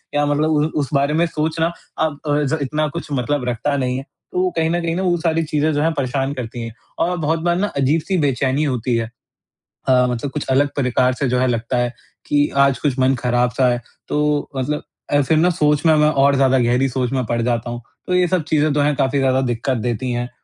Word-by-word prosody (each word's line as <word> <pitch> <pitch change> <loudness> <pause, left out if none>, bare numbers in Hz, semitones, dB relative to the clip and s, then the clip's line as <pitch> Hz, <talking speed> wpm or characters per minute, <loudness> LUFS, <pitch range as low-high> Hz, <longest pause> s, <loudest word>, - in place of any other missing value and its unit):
या 145 0 +2
मतलब 145 +2 +1
उ 150 -1 +2 0.2
उस 140 - -3
बारे 140 +1 +2
में 165 +2 +3
सोचना, 160 +1 -1 0.3
अब 155 -2 -1
अ, 145 0 +2
ज़ 145 +3 0
इतना 150 +3 -1
कुछ 170 +4 -6
मतलब 140 +1 -1
रखता 130 +5 -1
नहीं 125 -1 -1
है। 135 - -5 0.3
तो 370 0 +1
कहीं 160 0 +2
न 175 +1 0
कहीं 165 0 -1
ना, 185 - -1
वो 175 -2 +2
सारी 165 0 0
चीज़ें 150 0 0
जो 145 - 0
हैं, 165 - +2
परेशान 135 0 -1
करती 120 -2 -6
हैं 115 -1 -6 0.3
और 180 +1 +1
बहुत 160 0 0
बार 175 +1 +1
ना, 205 +3 +1
अजीब-सी 155 +7 +1
बेचैनी 140 -1 +1
होती 125 -4 -1
है। 115 -1 -1 0.8
अ, 125 -1 +4
मतलब 125 +3 -3
कुछ 150 - -4
अलग 140 +2 +3
प्रकार 125 -1 +2
से 140 +2 -1
जो 125 - +1
है, 130 - +2
लगता 115 0 -1
है 120 0 0 0.3
कि 145 0 +2
आज 140 -2 +4
कुछ 135 0 -1
मन 130 +1 +3
ख़राब-सा 125 +1 +1
है, 120 0 -2 0.3
तो 150 0 0
मतलब 135 +3 -2 0.3
अ, 145 - +4
फिर 155 +3 +2
ना 175 +3 +4
सोच 150 -2 +1
में 160 -1 +6
मैं 150 0 +4
और 140 -1 +3
ज़्यादा 135 -1 +3
गहरी 125 +2 +2
सोच 125 -1 -2
में 130 -2 -1
पड़ 120 +1 -1
जाता 120 0 -1
हूँ। 120 0 -5 0.3
तो 180 - +1
ये 180 0 +3
सब 175 -2 0
चीज़ें 155 -1 +1
तो 145 - +2
हैं, 145 0 +2
काफ़ी 135 0 +1
ज़्यादा 130 -1 +2
दिक्कत 125 +1 -1
देती 120 +2 -2
हैं 120 0 -2
140 Hz, 235 wpm, -20 LUFS, 125-155 Hz, 0.8 s, में